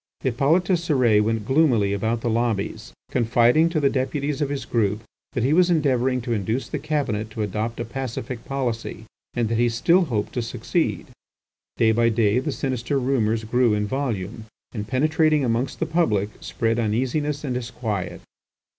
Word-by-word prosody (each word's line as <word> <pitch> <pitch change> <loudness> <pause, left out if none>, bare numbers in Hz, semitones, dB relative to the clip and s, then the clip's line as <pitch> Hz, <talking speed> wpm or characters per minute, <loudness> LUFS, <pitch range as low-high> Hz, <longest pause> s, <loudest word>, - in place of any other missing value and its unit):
Hippolyte 140 +8 +2
Cérès 150 - +3
went 110 0 -1
gloomily 125 -8 +3
about 110 +3 -1
the 120 - -2
lobbies, 110 -1 -1 0.2
confiding 120 +6 +3
to 165 -2 0
the 140 - +3
Deputies 140 +2 -1
of 145 - 0
his 140 -3 -3
group 105 -2 0 0.3
that 120 - -1
he 135 +4 +2
was 180 +2 +4
endeavouring 130 -6 +2
to 120 0 -2
induce 110 +4 -1
the - - -4
Cabinet 115 -8 -2
to 110 0 -3
adopt 110 +3 -3
a 120 - -2
pacific 125 -1 -5
policy, 120 -5 -3 0.3
and 120 -2 +1
that 115 +1 -1
he 120 0 +3
still 170 +11 +3
hoped 110 -8 -2
to 120 - -1
succeed. 115 - -1 0.7
Day 115 -1 +4
by 115 +1 +3
day 110 0 +2
the 145 +3 -2
sinister 130 0 -1
rumours 115 -4 +1
grew 120 0 +2
in 105 0 0
volume, 110 -4 -3 0.3
and 105 -3 -5
penetrating 155 +3 +2
amongst 120 +2 -1
the 165 - +1
public, 110 - +1
spread 115 0 -1
uneasiness 130 +7 -1
and 135 -4 -2
disquiet. 110 -7 -4
120 Hz, 165 wpm, -23 LUFS, 110-140 Hz, 0.7 s, was